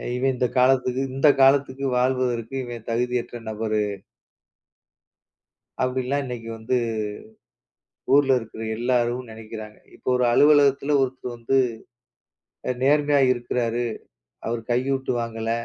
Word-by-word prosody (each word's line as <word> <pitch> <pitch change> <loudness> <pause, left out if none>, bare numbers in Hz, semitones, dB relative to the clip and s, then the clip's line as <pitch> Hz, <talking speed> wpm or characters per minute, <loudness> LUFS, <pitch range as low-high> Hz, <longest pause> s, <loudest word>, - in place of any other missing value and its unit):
இவன் 130 +2 +1
இந்தக் 125 +1 -1
காலத்துக்கு 130 0 +3
இந்தக் 140 0 +4
காலத்துக்கு 135 0 +3
வாழ்வதற்கு 125 -1 0
இவன் 120 -2 -8
தகுதியற்ற 120 0 -2
நபரு. 110 -1 -1 2.0
அப்படிலாம் 130 +2 -1
இன்னைக்கு 120 -2 -6
வந்து 115 +3 -1 1.4
ஊர்ல 140 -1 +5
இருக்குற 110 -1 -10 0.2
எல்லாரும் 120 0 0
நனைக்கிறாங்க. 110 -1 -9 0.2
இப்ப - - -20
ஒரு 125 - +1
அலுவலகத்துல 145 0 +4
ஒருத்தர் 130 -2 -3
வந்து 120 +3 0 1.3
நேர்மையா 145 +1 +3
இருக்குறாரு. 120 -1 -2 0.6
அவர் 115 0 -2
கையூட்டு 130 +2 0
வாங்கல. 115 -1 -3
125 Hz, 100 wpm, -24 LUFS, 115-135 Hz, 2.0 s, ஊர்ல